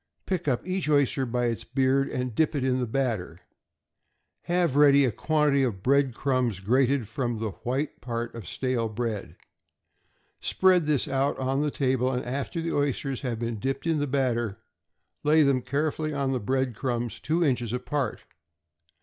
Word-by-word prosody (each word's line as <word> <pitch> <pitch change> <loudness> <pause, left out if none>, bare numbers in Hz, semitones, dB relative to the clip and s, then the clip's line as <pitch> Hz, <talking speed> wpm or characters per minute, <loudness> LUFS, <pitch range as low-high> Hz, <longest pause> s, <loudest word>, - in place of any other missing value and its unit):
Pick 180 -4 -2
up 130 +4 0
each 185 -4 -1
oyster 140 -2 +2
by 120 +1 0
its 115 -2 -1
beard, 135 0 +1
and 125 -3 -3
dip 155 +6 +1
it 140 - 0
in 130 -1 +1
the 125 - -1
batter. 115 -6 -2 1.0
Have 175 -5 +1
ready 140 -1 +6
a 125 - +1
quantity 150 +3 +2
of 110 -8 -1
bread 135 -2 +3
crumbs 125 -7 0
grated 125 +4 +2
from 120 +1 -2
the 110 -1 -3
white 135 +5 -2
part 120 -1 -4
of 115 -7 -8
stale 125 -1 -1
bread; 110 -2 -4 1.0
spread 185 -4 +3
this 150 -2 +2
out 140 0 0
on 135 +1 0
the 150 - +1
table, 130 -2 +1
and 125 -1 -2
after 140 +6 -3
the 165 0 -2
oysters 140 -2 -1
have 125 -5 -2
been 115 -1 -3
dipped 135 +5 -2
in 165 -2 +1
the 145 - 0
batter 120 -6 0 0.7
lay 155 +1 +5
them 135 -3 +2
carefully 155 +3 -1
on 140 -1 0
the 130 - 0
bread 130 +3 0
crumbs 120 -1 -2
two 165 +2 +1
inches 120 -5 0
apart. 125 +3 -2
130 Hz, 170 wpm, -27 LUFS, 120-145 Hz, 1.0 s, ready